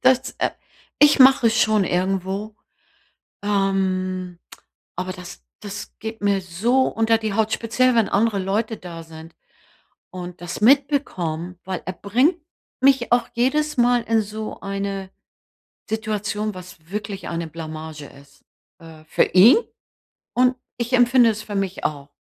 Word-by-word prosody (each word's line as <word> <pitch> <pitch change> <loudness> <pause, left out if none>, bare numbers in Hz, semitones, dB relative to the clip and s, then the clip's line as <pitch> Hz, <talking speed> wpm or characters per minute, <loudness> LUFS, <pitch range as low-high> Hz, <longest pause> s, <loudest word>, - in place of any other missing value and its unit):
das, 260 0 +3
äh - - +1 0.5
ich 295 0 +6
mache 260 -3 +7
schon 220 -2 +3
irgendwo, 190 +4 -2 0.9
ähm, 185 -3 -1 0.6
aber 185 +1 -4
das 180 - -11 0.2
das 205 0 -7
geht 220 0 -6
mir 200 -1 +2
so 205 +9 +1
unter 225 0 +2
die 220 -2 -3
Haut, 220 +1 +1
speziell, 250 +3 +2
wenn 230 -3 +3
andere 210 0 +1
Leute 210 +4 -1
da 170 -2 -9
sind 160 0 -13 0.8
und 180 -1 -8
das 175 -1 -6
mitbekommen, 210 - +1
weil 185 -2 -4
er 185 - -2
bringt 250 - +1 0.4
mich 265 -3 +3
auch 240 0 +3
jedes 300 +5 +1
Mal 245 -1 +3
in 225 -1 +1
so 215 +1 -6
eine 195 -1 -4 0.8
Situation, 215 -1 -2
was 180 -2 -13
wirklich 200 -1 -5
eine 170 -1 -3
Blamage 155 -1 -8
ist, 140 0 -18 0.3
äh, 160 -2 -14
für 155 - +2
ihn 200 - +7 0.8
und 250 +1 +3 0.2
ich 240 +1 -3
empfinde 245 -1 +5
es 215 - -6
für 210 -1 -7
mich 195 -1 -2
auch. 145 -1 -3
200 Hz, 140 wpm, -22 LUFS, 180-230 Hz, 0.9 s, mache